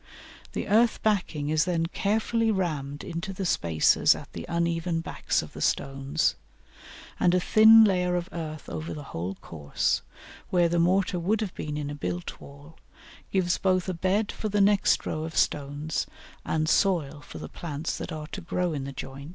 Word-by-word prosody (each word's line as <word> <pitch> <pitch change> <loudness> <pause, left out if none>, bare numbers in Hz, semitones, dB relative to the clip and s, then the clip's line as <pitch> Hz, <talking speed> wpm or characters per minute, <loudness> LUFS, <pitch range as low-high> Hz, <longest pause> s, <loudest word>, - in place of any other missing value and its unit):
The - - -3
earth 225 +3 +3
backing 175 -9 0
is 155 0 +2
then 170 -2 0
carefully 225 +5 0
rammed 150 -8 -2
into 170 +1 -5
the 190 0 -4
spaces 85 - +3
at - - -11
the - - -7
uneven 170 0 0
backs - - -1
of - - -11
the - - -8
stones, 135 +3 0 0.9
and 180 0 +4
a - - +4
thin 220 +4 +8
layer 180 -3 +2
of 175 0 -2
earth 155 -3 -6
over 155 0 -5
the 150 - -7
whole 90 +4 -3
course, 75 -4 -1 0.5
where 175 -2 +3
the 170 0 +1
mortar 185 +1 +2
would 200 +6 +1
have 205 -4 -3
been 150 -1 -4
in 145 -1 -3
a - - -4
built 90 -11 -5
wall, 145 +3 -14 0.5
gives 180 -3 +1
both 185 -1 +1
a 185 - -1
"bed" 190 +5 0
for 215 - -4
the 205 0 0
next 200 0 +3
row 155 - -2
of 160 0 -6
stones 145 +2 0 0.4
and 155 0 0
soil 160 -6 +2
for - - -10
the - - -7
plants 155 -1 -4
that - - -5
are 155 -1 -5
to 195 - -5
grow 175 0 -1
in 140 -3 -3
the 140 - -5
joints. 135 +2 -8
170 Hz, 185 wpm, -27 LUFS, 145-190 Hz, 0.9 s, thin